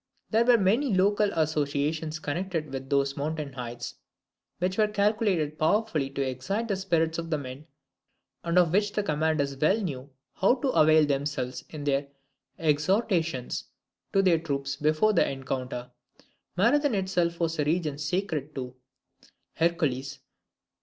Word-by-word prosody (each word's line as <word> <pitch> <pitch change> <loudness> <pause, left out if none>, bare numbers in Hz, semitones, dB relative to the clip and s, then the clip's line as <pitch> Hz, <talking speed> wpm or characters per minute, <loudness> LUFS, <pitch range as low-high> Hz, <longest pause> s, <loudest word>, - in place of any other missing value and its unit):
There 225 +1 +4
were 245 -1 +6
many 220 +4 +2
local 205 +2 +3
associations 155 0 0
connected 160 0 -3
with 135 0 -5
those 140 -1 +1
mountain 150 -1 -3
heights, 120 -2 -6 0.6
which 185 +3 -1
were 215 - +5
calculated 200 -7 +1
powerfully 160 -4 +1
to 135 0 -2
excite 185 - -2
the 200 - +1
spirits 165 -4 0
of 165 0 -5
the 155 - +1
men, 140 +2 -8 0.8
and 170 +1 0
of 175 -2 +4
which 205 +1 +2
the 210 - 0
commanders 155 -4 0
well 155 +10 +3
knew 140 -9 -4 0.2
how 195 +7 +3
to 265 +1 -1
avail 155 -7 +5
themselves 135 -3 -2
in 155 -2 -7
their 140 0 0 0.5
exhortations 165 - 0 0.5
to 195 - +3
their 175 -4 +4
troops 140 -3 -3
before 155 +9 +2
the - - +3
encounter. 130 -2 -4 0.7
Marathon 255 +6 +3
itself 180 -3 0
was 165 -1 -1
a - - +3
region 155 -2 0
sacred 155 -2 -2
to; 125 -2 -5 0.8
Hercules. 155 -6 0
155 Hz, 140 wpm, -27 LUFS, 140-190 Hz, 0.8 s, were